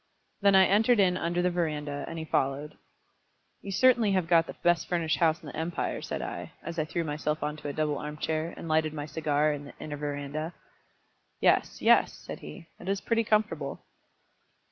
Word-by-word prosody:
Then 200 Hz, -1 st, +5 dB
I 190 Hz, 0 st, +8 dB
entered 220 Hz, +4 st, +4 dB
in 185 Hz, -2 st, +4 dB
under 175 Hz, 0 st, 0 dB
the 180 Hz, -, +2 dB
verandah, 150 Hz, -4 st, -2 dB
and 165 Hz, -, -6 dB
he 160 Hz, -, -4 dB
followed. 140 Hz, +1 st, -1 dB, 0.9 s
"You 200 Hz, -, -6 dB
certainly 235 Hz, -1 st, +4 dB
have 185 Hz, -3 st, +1 dB
got 165 Hz, -1 st, +4 dB
the -, -, -7 dB
best 175 Hz, -2 st, +3 dB
furnished 170 Hz, -3 st, +1 dB
house 165 Hz, -1 st, +3 dB
in -, -, -11 dB
the -, -, -9 dB
empire," 165 Hz, +2 st, -2 dB
said -, -, -4 dB
I, -, -, -6 dB
as 170 Hz, 0 st, -4 dB
I 155 Hz, -, +1 dB
threw 165 Hz, +2 st, -2 dB
myself 150 Hz, 0 st, -2 dB
on 150 Hz, 0 st, -2 dB
to 150 Hz, -, -7 dB
a 145 Hz, -, -3 dB
double 150 Hz, -2 st, 0 dB
arm 150 Hz, 0 st, -6 dB
chair, 160 Hz, +2 st, -1 dB
and -, -, -7 dB
lighted 155 Hz, -1 st, +1 dB
my 145 Hz, -1 st, -4 dB
cigar 150 Hz, 0 st, +1 dB
in 145 Hz, 0 st, -6 dB
the -, -, -11 dB
inner 150 Hz, -1 st, -5 dB
verandah. 145 Hz, +3 st, -4 dB, 0.8 s
"Yes, -, -, +2 dB
yes," -, -, +5 dB
said -, -, -9 dB
he; 75 Hz, -, -10 dB
"it 185 Hz, -, -6 dB
is 195 Hz, 0 st, +1 dB
pretty 230 Hz, +1 st, +1 dB
comfortable." 215 Hz, 0 st, 0 dB
160 Hz, 200 wpm, -29 LUFS, 150-180 Hz, 0.9 s, I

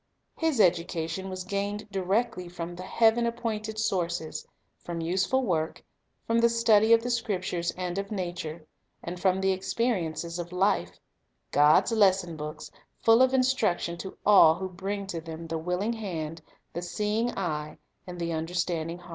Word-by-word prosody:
His 320 Hz, -6 st, 0 dB
education 175 Hz, 0 st, +1 dB
was 185 Hz, 0 st, -5 dB
gained 200 Hz, +2 st, -3 dB
directly 195 Hz, -1 st, -1 dB
from 175 Hz, 0 st, -6 dB
the 175 Hz, -, -8 dB
Heaven 225 Hz, +4 st, +3 dB
appointed 220 Hz, -2 st, -3 dB
sources; 175 Hz, -6 st, -2 dB, 0.3 s
from 170 Hz, -1 st, -5 dB
useful 190 Hz, +10 st, +1 dB
work, 165 Hz, -7 st, -1 dB, 0.4 s
from 230 Hz, 0 st, +2 dB
the 235 Hz, 0 st, +5 dB
study 225 Hz, -1 st, +4 dB
of 230 Hz, 0 st, +6 dB
the 245 Hz, -, -1 dB
Scriptures 185 Hz, -7 st, -1 dB
and 180 Hz, +1 st, -2 dB
of 200 Hz, 0 st, -4 dB
nature, 175 Hz, -5 st, -5 dB, 0.4 s
and 175 Hz, +1 st, -5 dB
from 190 Hz, 0 st, +2 dB
the 190 Hz, 0 st, +3 dB
experiences 185 Hz, -4 st, -1 dB
of 175 Hz, 0 st, -5 dB
life, 190 Hz, +3 st, 0 dB, 0.3 s
— -, -, -48 dB
God's 150 Hz, +9 st, +5 dB
lesson 190 Hz, -6 st, +3 dB
books, 150 Hz, 0 st, -7 dB, 0.3 s
full 225 Hz, +2 st, +6 dB
of 260 Hz, 0 st, +5 dB
instruction 255 Hz, -10 st, +1 dB
to 190 Hz, -, -7 dB
all 190 Hz, -6 st, +7 dB
who 190 Hz, +2 st, -4 dB
bring 195 Hz, +2 st, -4 dB
to 175 Hz, -4 st, -5 dB
them 165 Hz, 0 st, -8 dB
the 165 Hz, 0 st, -3 dB
willing 180 Hz, +7 st, -1 dB
hand, 165 Hz, -8 st, -5 dB, 0.3 s
the 175 Hz, -, -3 dB
seeing 210 Hz, +6 st, -1 dB
eye, 150 Hz, -5 st, -3 dB, 0.3 s
and 180 Hz, -1 st, -7 dB
the 170 Hz, -1 st, -2 dB
understanding 165 Hz, 0 st, -2 dB
heart. 180 Hz, 0 st, -15 dB
185 Hz, 160 wpm, -28 LUFS, 170-215 Hz, 0.4 s, all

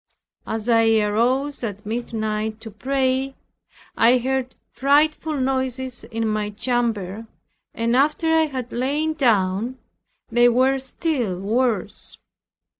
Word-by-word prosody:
As 220 Hz, 0 st, -3 dB
I 225 Hz, -1 st, +4 dB
arose 245 Hz, +7 st, 0 dB
at 205 Hz, -2 st, -5 dB
midnight 220 Hz, -1 st, -3 dB
to 225 Hz, -, -8 dB
pray, 265 Hz, +3 st, -1 dB, 0.6 s
I 240 Hz, +3 st, +5 dB
heard 260 Hz, +1 st, -2 dB, 0.2 s
frightful 300 Hz, +2 st, +2 dB
noises 260 Hz, -1 st, -2 dB
in 225 Hz, -1 st, -2 dB
my 215 Hz, -1 st, -1 dB
chamber 225 Hz, -2 st, -2 dB, 0.5 s
and 230 Hz, +1 st, +1 dB
after 300 Hz, +5 st, +2 dB
I 320 Hz, -1 st, +4 dB
had 255 Hz, -4 st, -5 dB
lain 290 Hz, +6 st, 0 dB
down 230 Hz, -3 st, +1 dB, 0.5 s
they 240 Hz, +1 st, +5 dB
were 260 Hz, +3 st, +3 dB
still 260 Hz, -, -2 dB
worse. 215 Hz, 0 st, -1 dB
245 Hz, 115 wpm, -22 LUFS, 220-265 Hz, 0.6 s, I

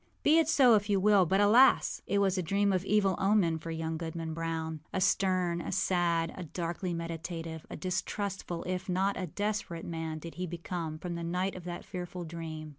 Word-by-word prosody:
Be 315 Hz, +2 st, +6 dB
it 320 Hz, -2 st, +2 dB
so 260 Hz, -6 st, +6 dB
if 205 Hz, -1 st, +2 dB
you 200 Hz, -1 st, +3 dB
will; 200 Hz, -2 st, +5 dB
but, 190 Hz, +4 st, +2 dB
alas! 235 Hz, +6 st, +5 dB
it 200 Hz, -, +1 dB
was 195 Hz, -2 st, +2 dB
a 185 Hz, -, 0 dB
dream 200 Hz, +3 st, +1 dB
of 185 Hz, -1 st, 0 dB
evil 195 Hz, -2 st, +2 dB
omen 190 Hz, -5 st, +3 dB
for 165 Hz, -, -7 dB
young 160 Hz, 0 st, -3 dB
Goodman 165 Hz, 0 st, -4 dB
Brown. 160 Hz, -1 st, -3 dB
A -, -, -1 dB
stern, 185 Hz, -2 st, +2 dB
a -, -, -5 dB
sad, 170 Hz, -2 st, +1 dB
a 185 Hz, -, -6 dB
darkly 175 Hz, +2 st, -3 dB
meditative, 165 Hz, -1 st, -5 dB
a -, -, -6 dB
distrustful, 190 Hz, -1 st, -3 dB
if 185 Hz, +1 st, -3 dB
not 190 Hz, +2 st, +1 dB
a 185 Hz, -, -3 dB
desperate 205 Hz, -2 st, -3 dB
man 160 Hz, -1 st, -4 dB
did 165 Hz, +2 st, -8 dB
he 180 Hz, -, -1 dB
become 170 Hz, -2 st, -4 dB
from 175 Hz, +2 st, -5 dB
the 170 Hz, 0 st, -4 dB
night 180 Hz, +3 st, -1 dB
of 180 Hz, -1 st, -9 dB
that 175 Hz, -1 st, -6 dB
fearful 180 Hz, 0 st, -6 dB
dream. 160 Hz, -2 st, -6 dB
175 Hz, 200 wpm, -30 LUFS, 165-195 Hz, -, Be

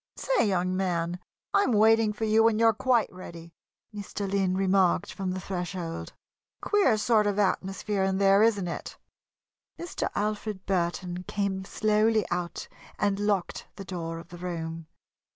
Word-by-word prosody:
"Say, -, -, +1 dB
young 185 Hz, -1 st, 0 dB
man, 175 Hz, -2 st, -1 dB, 0.3 s
I 200 Hz, -, +5 dB
am 245 Hz, -, +1 dB
waiting 220 Hz, 0 st, +4 dB
for 210 Hz, +1 st, -3 dB
you 220 Hz, +1 st, +4 dB
when 225 Hz, -1 st, +4 dB
you're 225 Hz, 0 st, +5 dB
quite 235 Hz, -1 st, +1 dB
ready," 170 Hz, -2 st, -10 dB, 0.4 s
Mr. 205 Hz, 0 st, -5 dB
Lynn 190 Hz, -1 st, 0 dB
remarked 190 Hz, -2 st, +2 dB
from 190 Hz, -1 st, -3 dB
the 185 Hz, +1 st, -3 dB
threshold. 180 Hz, -2 st, -5 dB, 0.5 s
"Queer 395 Hz, -, +3 dB
sort 215 Hz, -1 st, +3 dB
of 205 Hz, -1 st, 0 dB
atmosphere 195 Hz, 0 st, 0 dB
in 190 Hz, 0 st, +1 dB
there, 195 Hz, +1 st, +5 dB
isn't 210 Hz, -5 st, +3 dB
it?" 170 Hz, -, -6 dB, 0.8 s
Mr. 345 Hz, +1 st, -3 dB
Alfred 210 Hz, -2 st, -2 dB
Burton 180 Hz, -1 st, -1 dB
came 195 Hz, -2 st, -2 dB
slowly 215 Hz, 0 st, +2 dB
out 175 Hz, -1 st, -3 dB, 0.3 s
and 200 Hz, -1 st, 0 dB
locked 205 Hz, -3 st, -1 dB
the 195 Hz, -, -8 dB
door 165 Hz, -3 st, -5 dB
of 165 Hz, +1 st, -11 dB
the 175 Hz, -, -10 dB
room. 165 Hz, -2 st, -5 dB
195 Hz, 150 wpm, -27 LUFS, 180-215 Hz, 0.8 s, I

